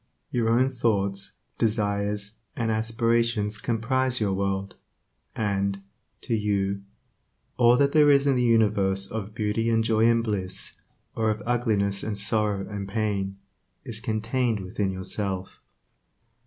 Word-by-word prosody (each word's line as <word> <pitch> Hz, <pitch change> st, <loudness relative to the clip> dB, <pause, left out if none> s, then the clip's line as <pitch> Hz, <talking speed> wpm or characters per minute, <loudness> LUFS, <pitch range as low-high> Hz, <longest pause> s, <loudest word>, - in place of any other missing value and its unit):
Your 115 Hz, -3 st, +1 dB
own 125 Hz, +3 st, +4 dB
thoughts, 100 Hz, -6 st, -1 dB, 0.3 s
desires, 105 Hz, -2 st, 0 dB, 0.2 s
and 115 Hz, -2 st, -1 dB
aspirations 115 Hz, -1 st, 0 dB
comprise 125 Hz, +2 st, 0 dB
your 100 Hz, -3 st, +1 dB
world, 95 Hz, 0 st, -2 dB, 0.6 s
and, 100 Hz, -2 st, -1 dB, 0.4 s
to 120 Hz, -, -3 dB
you, 100 Hz, -2 st, 0 dB, 0.7 s
all 120 Hz, 0 st, +5 dB
that 140 Hz, +1 st, +3 dB
there 150 Hz, -1 st, +5 dB
is 140 Hz, -1 st, +5 dB
in 140 Hz, -2 st, +3 dB
the 125 Hz, -, +2 dB
universe 105 Hz, -5 st, +2 dB
of 105 Hz, +1 st, -6 dB
beauty 110 Hz, +1 st, 0 dB
and 115 Hz, 0 st, +2 dB
joy 110 Hz, 0 st, +3 dB
and 115 Hz, 0 st, +3 dB
bliss, 95 Hz, -4 st, -2 dB, 0.4 s
or 110 Hz, -1 st, +1 dB
of 105 Hz, -1 st, -2 dB
ugliness 105 Hz, -5 st, +1 dB
and 105 Hz, -2 st, -3 dB
sorrow 105 Hz, -1 st, +1 dB
and 100 Hz, -2 st, -5 dB
pain, 100 Hz, -2 st, -2 dB, 0.5 s
is 110 Hz, -2 st, -2 dB
contained 115 Hz, 0 st, -1 dB
within 95 Hz, +1 st, -2 dB
yourself. 95 Hz, 0 st, -3 dB
110 Hz, 130 wpm, -26 LUFS, 100-115 Hz, 0.7 s, all